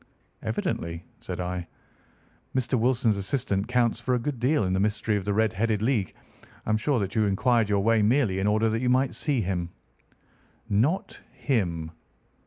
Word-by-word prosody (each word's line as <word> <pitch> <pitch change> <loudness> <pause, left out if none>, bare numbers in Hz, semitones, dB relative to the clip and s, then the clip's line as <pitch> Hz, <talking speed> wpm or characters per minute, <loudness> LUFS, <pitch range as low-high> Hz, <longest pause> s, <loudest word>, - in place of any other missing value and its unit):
"Evidently," 85 +1 -3
said - - -6
I, 90 -1 -3 0.9
"Mr. 130 0 -1
Wilson's 120 -3 +2
assistant 100 -1 -1
counts 120 -2 +1
for 125 +2 0
a - - 0
good 130 +1 -3
deal 135 +2 +2
in 95 -1 0
this 95 - +1
mystery 105 +1 0
of 100 -2 -2
the 105 - 0
Red 110 -2 +2
headed 110 +1 0
League. 115 -6 0 0.5
I - - -1
am 110 - +3
sure 125 +5 +1
that 100 -2 -2
you 110 -2 +2
inquired 115 +2 +2
your 100 -1 +2
way 115 0 +3
merely 105 -3 +2
in 95 - +1
order 110 +2 +3
that 110 +2 -1
you 125 - +1
might 130 +1 +2
see 140 -6 0
him." 90 -3 -2 1.0
"Not 125 - 0
him." 85 - -1
110 Hz, 180 wpm, -26 LUFS, 100-125 Hz, 1.0 s, am